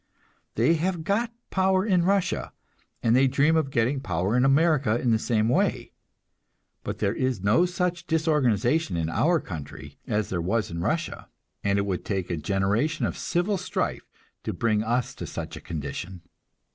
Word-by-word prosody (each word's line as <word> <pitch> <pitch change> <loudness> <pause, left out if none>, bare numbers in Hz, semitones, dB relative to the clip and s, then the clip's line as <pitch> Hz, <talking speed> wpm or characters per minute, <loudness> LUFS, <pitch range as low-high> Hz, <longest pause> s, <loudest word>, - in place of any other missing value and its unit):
They 120 +9 +4
have 175 -2 -1
got 220 +7 0 0.2
power 190 0 +2
in 185 -5 +3
Russia, 195 +1 0 0.5
and 115 0 +4
they 135 +1 +5
dream 140 +5 +3
of 155 -4 +1
getting 130 +2 +1
power 95 -3 -1
in 125 - +3
America 135 -4 +3
in 120 - +1
the 110 - +3
same 110 -1 +1
way. 120 - +1 0.9
But - - -4
there 100 -1 0
is 130 -6 -1
no 115 - +4
such 175 -1 -2
disorganization 150 - +1
in 80 -1 -1
our 165 - +2
country 75 - -8
as 105 -3 -1
there 90 -2 -1
was 105 +5 -1
in 85 0 -4
Russia, 165 - -2 0.3
and 100 0 +2
it 100 - +1
would 95 -3 -2
take 95 -4 -2
a 85 - -1
generation 105 - 0
of - - -2
civil 185 +3 0
strife - - -3 0.3
to - - -3
bring 110 -2 +1
us 120 +3 -1
to - - -7
such - - -6
a - - -9
condition. 85 +4 -6
120 Hz, 170 wpm, -26 LUFS, 100-160 Hz, 0.9 s, they